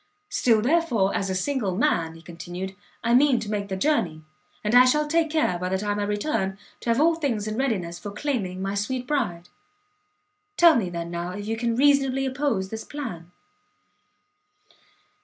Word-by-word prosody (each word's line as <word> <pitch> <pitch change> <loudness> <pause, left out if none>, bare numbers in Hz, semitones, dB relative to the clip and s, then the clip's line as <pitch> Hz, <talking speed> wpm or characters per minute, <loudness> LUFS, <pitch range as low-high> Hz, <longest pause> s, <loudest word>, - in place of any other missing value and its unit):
"Still, 225 - +2
therefore, 245 - +2
as 195 - -1
a 190 - -1
single 205 -2 -1
man," 165 -7 +1
he 165 - -14
continued, 175 +3 -7 0.3
"I 235 0 +2
mean 260 -1 +5
to 210 - -5
make 200 -1 -2
the 190 -1 -3
journey, 185 - 0 0.4
and 210 +2 -1
I 250 +1 +9
shall 300 +4 +3
take 325 +1 +2
care, 300 - +1
by 180 +1 -2
the 190 - 0
time 205 +1 -2
I 205 - 0
return, 205 -2 -1 0.2
to - - -5
have 230 +2 +3
all 330 +3 +5
things 255 -10 -2
in 215 - -3
readiness 195 -10 -1
for 205 - -6
claiming 200 -5 -3
my 195 0 -2
sweet 245 +5 -2
Bride. 215 - -2 1.1
Tell 340 -1 +8
me, 200 -6 0
then, 170 -1 -5
now, 175 +1 -4
if 205 +1 -6
you 220 +1 -1
can 230 0 -1
reasonably 270 0 +3
oppose 260 -8 -1
this 220 +1 -5
plan?" 180 - -7
215 Hz, 180 wpm, -25 LUFS, 190-270 Hz, 1.1 s, I